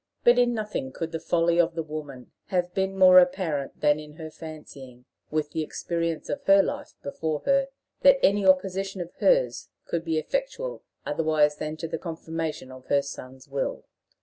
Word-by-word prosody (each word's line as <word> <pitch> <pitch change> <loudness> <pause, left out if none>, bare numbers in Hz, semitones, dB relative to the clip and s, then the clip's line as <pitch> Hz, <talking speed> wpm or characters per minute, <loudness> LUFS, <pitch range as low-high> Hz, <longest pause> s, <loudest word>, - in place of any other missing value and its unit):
But 240 +1 +6
in 240 -1 +3
nothing 210 -11 -4
could 165 +4 -5
the 165 - -3
folly 170 +1 +1
of 165 -1 +3
the 165 - -2
woman 150 -5 -8 0.2
have 180 -2 -1
been 190 0 -1
more 185 -1 +9
apparent 175 -6 0
than 150 0 +3
in 150 0 -11
her 155 0 -9
fancying, 140 -6 -11 0.2
with 150 -1 -2
the 160 - -2
experience 165 +1 -3
of - - -3
her 195 0 +6
life - - -5
before 150 +1 -3
her, 275 0 +2 0.3
that 275 -1 +7
any 200 +1 +4
opposition 190 +1 +2
of 175 -1 -6
hers - - +2 0.2
could 170 -1 -2
be 165 -2 -1
effectual - - -3 0.2
otherwise 155 -2 +2
than 155 +1 -4
to 165 - -4
the 160 - -4
confirmation 160 -4 -5
of 130 0 -13
her 140 0 +2
son's 130 -1 -9
will. 140 -1 -3
165 Hz, 175 wpm, -26 LUFS, 150-190 Hz, 0.3 s, more